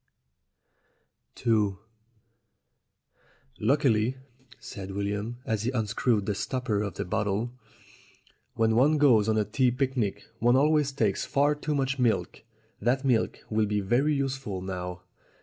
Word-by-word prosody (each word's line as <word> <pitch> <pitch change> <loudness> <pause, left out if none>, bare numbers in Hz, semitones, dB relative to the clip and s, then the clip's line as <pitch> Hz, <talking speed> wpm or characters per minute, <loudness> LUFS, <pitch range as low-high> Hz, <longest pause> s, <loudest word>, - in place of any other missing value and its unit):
ii 105 -4 +2 1.8
"LUCKILY," 125 -1 +2 0.4
said 95 -1 -8
William, 100 +4 -3
as 110 -2 -1
he 115 - -1
unscrewed 110 -2 0
the 105 - 0
stopper 120 0 -2
of 100 -4 -4
the - - -3
bottle, 105 +4 -1 1.0
"when 110 0 +2
one 145 +6 +4
goes 115 -7 +4
on 110 - +2
a 105 - +2
tea 125 +5 +2
picnic, 125 -4 -1 0.2
one 120 +2 +4
always 150 +1 +3
takes 110 -8 0
far 145 +2 +2
too 150 0 -3
much 135 0 -1
milk. 120 -3 0 0.4
That 130 +5 +1
milk 125 -4 +1
will 110 0 +2
be 105 0 0
very 125 +10 +1
useful 130 -9 -3
now. 90 -1 -5
115 Hz, 130 wpm, -27 LUFS, 105-135 Hz, 1.8 s, one